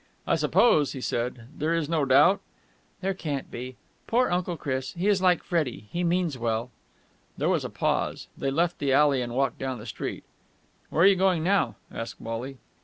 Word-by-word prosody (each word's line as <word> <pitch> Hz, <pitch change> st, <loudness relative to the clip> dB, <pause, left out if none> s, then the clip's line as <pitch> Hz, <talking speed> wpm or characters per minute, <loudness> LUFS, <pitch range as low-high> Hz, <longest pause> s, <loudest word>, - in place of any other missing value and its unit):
"I -, -, +1 dB
suppose," 150 Hz, -, +3 dB
he 135 Hz, -, -6 dB
said, 120 Hz, -1 st, -3 dB
"there 160 Hz, +3 st, 0 dB
is 165 Hz, -3 st, -1 dB
no 160 Hz, -3 st, +1 dB
doubt...?" 150 Hz, +9 st, +5 dB, 0.6 s
"There 195 Hz, 0 st, 0 dB
can't 145 Hz, -7 st, -4 dB
be. 125 Hz, +1 st, -6 dB, 0.3 s
Poor 250 Hz, 0 st, +2 dB
Uncle 175 Hz, -1 st, -1 dB
Chris! 130 Hz, -3 st, -3 dB
He 175 Hz, +4 st, -2 dB
is 200 Hz, -2 st, +3 dB
like 180 Hz, -2 st, +3 dB
Freddie. 140 Hz, -, -2 dB
He 175 Hz, -, -1 dB
means 170 Hz, -5 st, 0 dB
well!" 115 Hz, +1 st, -1 dB, 0.7 s
There -, -, +1 dB
was -, -, +1 dB
a -, -, -4 dB
pause. -, -, -1 dB
They 135 Hz, -, -2 dB
left 170 Hz, +5 st, 0 dB
the 140 Hz, -2 st, +1 dB
alley 140 Hz, -2 st, +4 dB
and 120 Hz, -1 st, -4 dB
walked 135 Hz, 0 st, 0 dB
down 130 Hz, -1 st, -3 dB
the 110 Hz, -, -10 dB
street. 115 Hz, -, -5 dB, 0.7 s
"Where 165 Hz, -, +2 dB
are -, -, +8 dB
you 195 Hz, 0 st, +7 dB
going 185 Hz, -3 st, +2 dB
now?" 195 Hz, +3 st, +2 dB, 0.2 s
asked 115 Hz, 0 st, -6 dB
Wally. 120 Hz, +4 st, -5 dB
145 Hz, 190 wpm, -27 LUFS, 130-175 Hz, 0.7 s, are